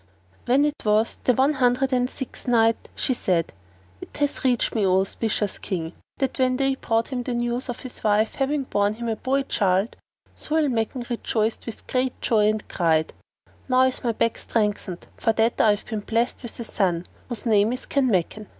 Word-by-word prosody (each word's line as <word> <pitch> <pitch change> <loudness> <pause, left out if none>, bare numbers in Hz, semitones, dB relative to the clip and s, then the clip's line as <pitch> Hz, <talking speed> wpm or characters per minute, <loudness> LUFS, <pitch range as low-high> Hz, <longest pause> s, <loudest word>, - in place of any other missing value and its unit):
When 270 +4 +4
it 295 0 -3
was 215 +1 +2
the 250 - +4
One 270 +5 +3
Hundred 260 0 +2
and 250 0 +2
Sixth 265 -2 -8
Night, 225 -2 +2
She 260 - +1
said, 175 -8 0 0.5
It - - -10
hath 290 -1 -1
reached 250 -3 +2
me, 220 - +1
O 190 -1 +4
auspicious 205 +1 -2
King, 170 -4 -4 0.2
that 270 -1 -2
when 255 -1 +2
they 270 0 +2
brought 225 -3 -1
him 255 -2 -2
the 245 0 -3
news 240 +2 -2
of 245 - -5
his 255 - -8
wife 215 +1 +2
having 275 +1 0
borne 205 -4 0
him 235 +1 -5
a 225 - 0
boy 270 +4 0
child, 195 -3 +1 0.4
Zau 310 - -2
al 290 - +1
Makan 240 +1 -2
rejoiced 225 -2 -1
with 230 - -7
great 255 0 -1
joy 215 -2 +3
and 215 -1 -2
cried, 160 -3 +1 0.6
"Now 255 0 +5
is 260 0 +1
my 235 - +2
back 230 +1 0
strengthened, 210 -5 -2
for 225 - +1
that 225 +1 +2
I 220 - +5
have 205 0 +1
been 220 -2 -3
blessed 230 +4 -1
with 240 -2 -7
a - - -3
son[FN#455] 180 -6 -1 0.2
whose 240 -2 -4
name 215 -1 +4
is 255 - -4
Kanmakan." 215 -6 0
230 Hz, 195 wpm, -24 LUFS, 210-255 Hz, 0.6 s, Now